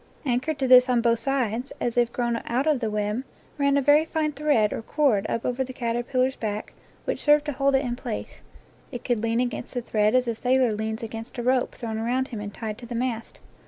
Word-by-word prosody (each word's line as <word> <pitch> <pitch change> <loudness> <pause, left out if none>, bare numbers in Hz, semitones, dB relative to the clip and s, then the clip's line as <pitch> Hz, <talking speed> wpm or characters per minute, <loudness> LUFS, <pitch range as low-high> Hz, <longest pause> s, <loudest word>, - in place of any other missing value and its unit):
Anchored 265 +4 0
to 270 -1 0
this 255 0 +7
on 245 -1 +3
both 230 -1 +2
sides, 250 -1 -1
as 240 - -1
if 240 -1 +2
grown 240 -1 -1
out 250 +4 0
of 305 -4 +2
the 225 -3 -1
web,, 210 +3 -1 0.4
ran 280 0 +3
a 280 - +2
very 295 +3 +6
fine 315 -1 -1
thread 285 -8 +2
or - - -4
cord 225 -5 +1
up 230 - -2
over 250 +1 0
the 260 0 -8
caterpillar's 250 +2 0
back, 210 -1 -4 0.3
which - - -2
served 295 0 +4
to 295 - -1
hold 275 0 +2
it 270 +1 +2
in 240 -1 -2
place; 245 -3 -6 0.5
it 245 -3 -6
could 240 -4 0
lean 230 +1 0
against 245 0 -3
the 245 - 0
thread 215 0 +2
as 255 -1 +3
a 235 - +1
sailor 250 0 +2
leans 220 +1 -3
against 225 +2 -7
a 240 - -3
rope 255 0 +1
thrown 220 -2 -4
around 250 +4 0
him 225 - -5
and 205 -1 -5
tied 215 0 -6
to 240 - -10
the 240 - -5
mast. 230 -1 -3
245 Hz, 230 wpm, -25 LUFS, 225-265 Hz, 0.5 s, this